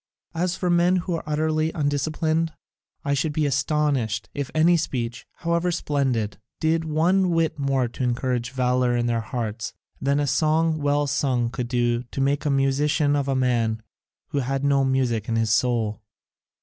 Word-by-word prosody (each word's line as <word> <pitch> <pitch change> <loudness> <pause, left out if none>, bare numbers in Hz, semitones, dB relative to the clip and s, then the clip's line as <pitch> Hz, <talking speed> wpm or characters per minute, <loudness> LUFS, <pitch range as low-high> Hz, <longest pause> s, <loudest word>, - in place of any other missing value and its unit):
As 175 +2 -1
for 180 -2 -1
men 175 +1 +4
who 180 0 -1
are 165 - -3
utterly 155 +1 0
undisciplined, 155 +2 0 0.5
I 140 - +1
should 145 +2 0
be 155 0 +1
astonished 140 -5 0
if 140 -2 -3
any 165 +3 +5
speech, 125 -7 -3
however 170 +1 0
splendid, 130 -11 -1 0.2
did 160 +1 +1
one 175 +5 +2
whit 165 -3 0
more 135 -2 +1
to 125 - -5
encourage 125 -1 -1
valour 125 -1 +1
in 120 - 0
their 115 -1 0
hearts 115 -1 -4 0.3
than 140 +1 +1
a 145 - +1
song 155 +3 +2
well 145 0 +1
sung 130 -4 0
could 125 -2 -3
do 120 -1 +1
to 125 +2 -8
make 140 +2 +1
a - - +2
musician 145 +2 +2
of 140 -1 0
a 135 - +1
man 115 -4 +1 0.5
who 145 - -1
had 135 +1 -2
no 140 -1 +3
music 125 -5 0
in 115 - 0
his 115 -1 +1
soul." 115 -2 +1
140 Hz, 170 wpm, -24 LUFS, 125-155 Hz, 0.5 s, any